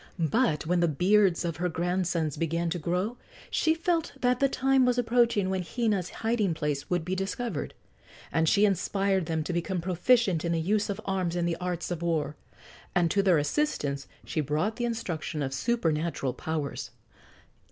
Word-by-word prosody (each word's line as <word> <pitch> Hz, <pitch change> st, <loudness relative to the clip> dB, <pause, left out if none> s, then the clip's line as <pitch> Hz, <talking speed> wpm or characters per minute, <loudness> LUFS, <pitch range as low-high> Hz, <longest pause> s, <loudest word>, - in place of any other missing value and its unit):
But 165 Hz, -, +1 dB
when 175 Hz, +2 st, +2 dB
the 170 Hz, -, +3 dB
beards 180 Hz, +3 st, +3 dB
of 165 Hz, -2 st, -2 dB
her 180 Hz, +2 st, 0 dB
grandsons 170 Hz, -2 st, -1 dB
began 165 Hz, +1 st, -1 dB
to 175 Hz, -, -2 dB
grow 180 Hz, +9 st, -1 dB, 0.3 s
she 320 Hz, 0 st, +2 dB
felt 335 Hz, -1 st, 0 dB
that 250 Hz, 0 st, +2 dB
the 275 Hz, -, +3 dB
time 265 Hz, 0 st, +3 dB
was 250 Hz, -1 st, +2 dB
approaching 235 Hz, -4 st, +2 dB
when 190 Hz, -1 st, 0 dB
Hina's 205 Hz, -2 st, -1 dB, 0.2 s
hiding 215 Hz, -7 st, +1 dB
place 150 Hz, -3 st, -2 dB
would 175 Hz, -2 st, 0 dB
be 180 Hz, -, -2 dB
discovered, 195 Hz, -1 st, -3 dB, 0.6 s
and 160 Hz, -1 st, +2 dB
she 210 Hz, 0 st, +5 dB
inspired 195 Hz, -2 st, +1 dB
them 160 Hz, -2 st, -1 dB
to 175 Hz, -, -3 dB
become 175 Hz, +2 st, -1 dB
proficient 185 Hz, +1 st, +2 dB
in 170 Hz, -1 st, 0 dB
the 165 Hz, -, +1 dB
use 205 Hz, +6 st, +1 dB
of 200 Hz, -, -3 dB
arms 185 Hz, -3 st, -1 dB
and 175 Hz, -1 st, 0 dB
the 170 Hz, -, 0 dB
arts 180 Hz, -1 st, -3 dB
of 170 Hz, -2 st, -3 dB
war. 155 Hz, -4 st, -1 dB, 0.6 s
And 170 Hz, -2 st, +3 dB
to 200 Hz, -, +3 dB
their 185 Hz, -4 st, +4 dB
assistance 145 Hz, -, -1 dB, 0.2 s
she 155 Hz, -, -1 dB
brought 155 Hz, +10 st, -1 dB
the 240 Hz, -, -1 dB
instruction 175 Hz, -10 st, -3 dB
of 135 Hz, -1 st, -3 dB
supernatural 160 Hz, -, 0 dB
powers. 155 Hz, +1 st, -4 dB
180 Hz, 175 wpm, -28 LUFS, 160-210 Hz, 0.6 s, she